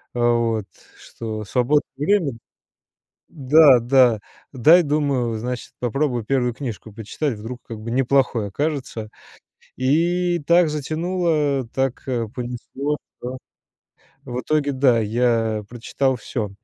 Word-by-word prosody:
Э, - - -3
вот 115 -3 +1 0.3
что 110 -2 -7
свободное 125 +7 +1 0.2
время, 190 -8 +2 1.0
да 145 -3 +6
да 120 -2 +4 0.3
дай, 160 +8 +6
думаю, 140 -6 0
э, - - -4
значит, 125 +1 -5
попробую 125 -1 -1
1 125 -1 0
книжку 115 -4 -7
прочитать. 115 +6 -3
Вдруг, 120 +3 -7
как 115 -2 -8
бы, 115 +2 -6
неплохой 125 -4 +1
окажется, 130 -3 -3 0.7
и 175 +6 +1
так 170 -1 +5
затянуло. 155 -3 -1
Так, 135 -1 -1
э, 120 -3 -1
понесло, 125 +4 -4 0.2
что 125 +1 -5 0.9
в 125 0 -4
итоге 150 -1 0
да, 130 -3 +3
я 115 -1 0
прочитал 130 +2 -1
всё. 110 -3 -4
130 Hz, 120 wpm, -22 LUFS, 115-150 Hz, 1.0 s, да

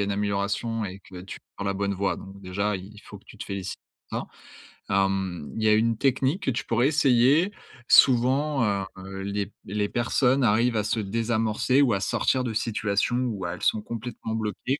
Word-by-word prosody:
a - - +1
une 100 - -1
amélioration 100 +3 -1
et 95 0 -6
que 90 -1 -11
tu 95 - -8 0.2
prends 100 - -5
la 100 - 0
bonne 100 0 -1
voie. 100 +1 -1
Donc 95 +1 -11
déjà 100 +3 -1
il 100 +3 -11
faut 100 - -11
que - - -25
tu 110 - -15
te - - -5
félicites 100 -2 -5 0.3
pour - - -2
ça, - - -8 0.8
hem, 95 -5 -3
il 110 - -2
y 110 - +4
a 105 - +6
une 115 +1 +2
technique 135 - +1
que - - +1
tu 120 - -3
pourrais 120 +3 +2
essayer. 145 +4 +4 0.4
Souvent, 135 +2 +5 0.3
heu, 95 +1 -7
les 100 0 -2
p - - -20
les 105 +1 -1
personnes 125 +2 +2
arrivent 115 +2 +3
à 105 - +1
se 110 - -1
désamorcer 115 +4 +1
ou 120 -6 +3
à 100 - 0
sortir 130 +5 +1
de 115 -3 -3
situations 105 +1 0
où 100 -6 -4
elles 85 0 -5
sont 110 - +2
complètement 115 -1 -5
bloquées 110 +5 -2
110 Hz, 205 wpm, -26 LUFS, 100-120 Hz, 0.8 s, a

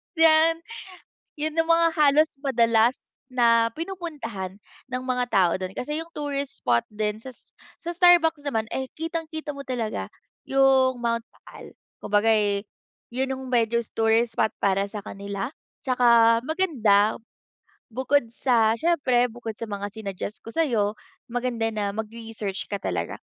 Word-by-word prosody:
Diyan. 325 0 +4 0.8
Yun 310 +2 -2
ang 325 - -11
mga 335 0 +5
halos 305 0 +4
madalas 235 -2 +2 0.2
na 230 -2 +4
pinupuntahan 285 - -6 0.3
ng 255 0 -3
mga 255 -1 0
tao 185 -5 +3
dun 185 -1 -3
kasi 295 +4 -3
yung 330 - -14
tourist 280 -2 -4
spot 120 -1 +2
din 210 0 -3
sas 260 -1 -13 0.2
sa 345 +1 -5
Starbucks 335 -3 +5
naman, 220 -3 -1
eh, 265 -1 -3
kitang-kita 320 -2 -4
mo 280 - -7
talaga 240 -5 -3 0.3
yung 265 -1 +3
Mount 235 -1 -1
Taal. - - -14 0.3
Kumbaga, 205 +1 +1
eh, 205 -1 0 0.5
yun 265 +1 -1
yung 265 0 -4
medyos 235 -2 0
tourist 225 +1 +2
spot 220 - +2
para 195 0 +1
sa 210 - -5
kanila. 200 -1 -5 0.4
Tsaka 235 -2 +5
maganda, 245 - +2 0.8
bukod 260 +4 +2
sa 230 -3 +2
siyempre 270 -8 +2
bukod 230 -1 -7
sa 230 - -5
mga 205 -1 -5
sinuggest 200 -1 -6
ko - - -20
sa'yo. 225 -10 +1 0.3
Maganda 240 -2 -1
na 205 -1 -1
mag-research 220 -2 -6
ka 200 - -2
talaga. - - -3
240 Hz, 140 wpm, -25 LUFS, 220-285 Hz, 0.8 s, mga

